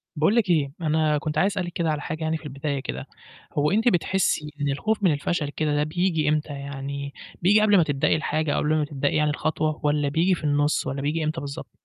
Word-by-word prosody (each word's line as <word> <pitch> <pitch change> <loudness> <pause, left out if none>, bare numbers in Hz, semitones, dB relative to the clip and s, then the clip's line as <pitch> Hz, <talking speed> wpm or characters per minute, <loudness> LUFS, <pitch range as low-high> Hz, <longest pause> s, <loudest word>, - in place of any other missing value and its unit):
باقول 160 +8 +2
لِك 225 -5 +2
إيه 150 -5 +2
أنا 155 -1 +2
كنت 150 +1 -3
عايز 200 +1 +3
أسألِك 180 -3 -3
كده 170 -2 0
على 150 -1 -2
حاجة 160 +1 -4
يعني 160 0 0
في - - -17
البداية 140 0 -3
كده، - - -5 0.5
هو 150 +3 +2
أنتِ 220 +4 +2
بتحسي 175 -6 +1
إن 145 - +1
الخوف 215 +9 -1
من 185 - +5
الفشل 150 +1 -1
كده 150 0 -1
ده 145 - +2
بييجي 160 -1 0
إمتى 150 -1 0
يعني، 140 0 -6 0.3
بييجي 205 +5 +5
قبل 210 -1 +5
ما 175 - +5
تبدئي 145 -3 +1
الحاجة 155 -1 -1
قبل 155 +1 +1
ما 155 -1 +1
تبدئي 145 -1 -1
يعني 150 0 +2
الخطوة 155 +1 -1
والَّا 145 -1 +1
بييجي 170 +6 +2
في 170 - -10
النُص، 145 0 +1
والَّا 135 +1 -3
بييجي 155 +3 -1
إمتى 155 +2 -2
بالضبط؟ 140 0 -7
155 Hz, 225 wpm, -24 LUFS, 145-170 Hz, 0.5 s, من